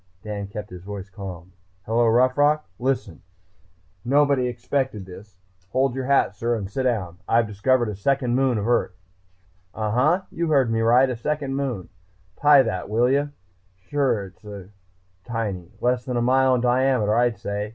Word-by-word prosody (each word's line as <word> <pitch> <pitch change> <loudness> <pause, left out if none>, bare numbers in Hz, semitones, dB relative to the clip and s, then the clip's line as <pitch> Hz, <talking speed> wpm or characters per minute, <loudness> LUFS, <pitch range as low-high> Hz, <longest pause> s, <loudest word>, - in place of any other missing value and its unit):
Dan 105 -2 -5
kept 105 0 -8
his 90 -1 -9
voice 100 0 -8
calm. 95 -2 -9 0.3
"Hello, 115 +1 +2
Rough 125 +3 +3
Rock.... 150 +1 +2
Listen... 125 -9 -2 0.8
nobody 140 -1 +3
expected 125 -3 -2
this... 95 +2 -13 0.3
hold 130 +2 +1
your 130 0 -4
hat, 140 -7 +3
sir, 120 +4 -1
and 100 -4 -4
sit 105 +7 -3
down. 95 -8 -1
I've 115 0 +3
discovered 115 +4 +1
a 105 - -4
second 125 +3 0
moon 130 -3 +2
of 105 +1 -2
Earth!... 120 -6 +1 0.8
Uhhuh, 130 - +1
you 170 0 -2
heard 135 -6 +3
me 115 - +1
right! 120 +4 +5
a 125 - -3
second 140 +3 -3
moon! 130 -10 -3 0.5
Tie 145 -2 +6
that, 105 -6 -4
will 120 +4 +2
you?... 145 +1 +1 0.6
Sure, 130 -8 +1
it's 100 -2 -11 0.5
tiny, 105 -7 -4
less 125 0 +1
than 125 -2 -2
a - - +1
mile 130 +1 +4
in 125 - 0
diameter 125 -3 +2
I'd 120 -2 +2
say. 100 +1 -4
120 Hz, 165 wpm, -23 LUFS, 105-130 Hz, 0.8 s, Tie